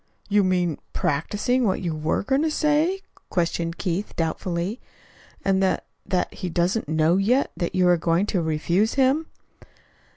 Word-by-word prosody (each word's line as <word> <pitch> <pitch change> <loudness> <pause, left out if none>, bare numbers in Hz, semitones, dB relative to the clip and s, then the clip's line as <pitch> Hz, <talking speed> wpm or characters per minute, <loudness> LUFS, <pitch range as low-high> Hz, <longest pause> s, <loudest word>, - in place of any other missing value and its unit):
"You 205 0 +4
mean 180 -4 +1
practicing 205 - 0
what 195 -4 +1
you 170 -4 -2
were 155 +3 -1
going 270 +6 +1
to 320 - +1
say?" 310 +5 +1 0.3
questioned 170 -1 -1
Keith 185 +3 -3
doubtfully. 170 +6 -2 0.6
"And 195 -1 +2
that 190 - +1 0.2
that 185 -2 0
he 185 - -5
doesn't 175 +2 0
know 160 +3 +3
yet 240 +8 +2
that 175 0 -3
you 180 -1 +4
are 175 -1 +5
going 170 +3 +1
to 195 -4 0
refuse 170 +6 +1
him?" 275 +4 +2
185 Hz, 155 wpm, -24 LUFS, 170-220 Hz, 0.6 s, are